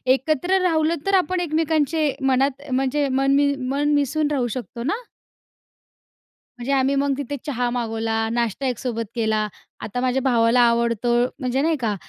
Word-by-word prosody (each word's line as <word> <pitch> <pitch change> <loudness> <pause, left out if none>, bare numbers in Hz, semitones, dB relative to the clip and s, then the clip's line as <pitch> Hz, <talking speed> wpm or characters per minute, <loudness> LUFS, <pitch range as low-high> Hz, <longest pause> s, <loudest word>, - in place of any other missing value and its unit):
एकत्र 310 +7 0
राहिलं 325 -2 +2
तर 395 - 0
आपण 370 0 +1
एकमेकांचे 315 -2 +1
मनात 270 +1 +1
म्हणजे 270 +3 +1
मन 270 +1 +1
मी 285 0 +3
मन 290 +3 +1
मिसळून 290 +1 +1
राहू 260 -4 0
शकतो 240 -1 -6
ना? 310 - -1 1.6
म्हणजे 245 +3 -4
आम्ही 270 0 +2
मग 280 0 +1
तिथे 285 0 -4
चहा 250 -4 -1
मागवला, 225 -2 -1
नाष्टा 235 +2 -1
एकसोबत 240 -2 -3
केला. 220 -2 0 0.3
आता 235 +4 -4
माझ्या 255 +1 +1
भावाला 240 -1 +3
आवडतो 235 0 0 0.3
म्हणजे 255 0 0
नाही 320 +2 +2
का? 220 -4 -1
265 Hz, 150 wpm, -22 LUFS, 240-295 Hz, 1.6 s, मी